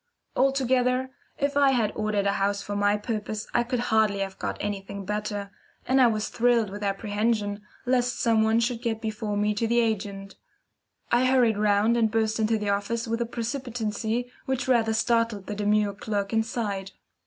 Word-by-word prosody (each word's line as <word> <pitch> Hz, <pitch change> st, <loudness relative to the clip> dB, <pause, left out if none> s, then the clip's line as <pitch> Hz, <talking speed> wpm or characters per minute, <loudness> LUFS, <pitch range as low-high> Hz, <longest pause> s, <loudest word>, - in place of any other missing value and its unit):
Altogether, 260 Hz, -1 st, +2 dB, 0.3 s
if 280 Hz, 0 st, -1 dB
I 280 Hz, -1 st, +5 dB
had 225 Hz, -4 st, +1 dB
ordered 215 Hz, -2 st, 0 dB
a 200 Hz, -, +3 dB
house 200 Hz, 0 st, 0 dB
for 205 Hz, -, -4 dB
my 205 Hz, +1 st, +2 dB
purpose 215 Hz, 0 st, -4 dB
I -, -, +3 dB
could 245 Hz, +1 st, -2 dB
hardly 215 Hz, -2 st, +3 dB
have 195 Hz, -1 st, -4 dB
got -, -, -3 dB
anything 200 Hz, -1 st, -4 dB
better, 205 Hz, 0 st, -3 dB, 0.4 s
and 265 Hz, +1 st, +4 dB
I 250 Hz, -, +7 dB
was 215 Hz, -2 st, -1 dB
thrilled 235 Hz, -3 st, +2 dB
with 205 Hz, +1 st, -7 dB
apprehension 205 Hz, +1 st, -1 dB, 0.2 s
lest 250 Hz, -1 st, +1 dB
some 225 Hz, -2 st, +3 dB
one 220 Hz, +1 st, +3 dB
should 235 Hz, 0 st, -1 dB
get 230 Hz, -3 st, -1 dB
before 215 Hz, -1 st, -3 dB
me 210 Hz, +1 st, +1 dB
to 225 Hz, +2 st, -1 dB
the 235 Hz, +1 st, +3 dB
agent. 200 Hz, -3 st, -2 dB, 0.7 s
I 240 Hz, +2 st, +4 dB
hurried 245 Hz, -5 st, +3 dB
round 210 Hz, +2 st, +3 dB
and 225 Hz, -2 st, +3 dB
burst 220 Hz, 0 st, 0 dB
into 220 Hz, +1 st, +2 dB
the 210 Hz, -1 st, -2 dB
office 205 Hz, +4 st, -1 dB
with 230 Hz, +1 st, -1 dB
a 235 Hz, -, 0 dB
precipitancy 235 Hz, -1 st, -3 dB, 0.2 s
which 265 Hz, 0 st, -1 dB
rather 230 Hz, -3 st, +3 dB
startled 230 Hz, -3 st, +1 dB
the 210 Hz, -, -4 dB
demure 210 Hz, 0 st, +1 dB
clerk 205 Hz, 0 st, -3 dB
inside. 215 Hz, -4 st, -2 dB
220 Hz, 175 wpm, -26 LUFS, 205-235 Hz, 0.7 s, I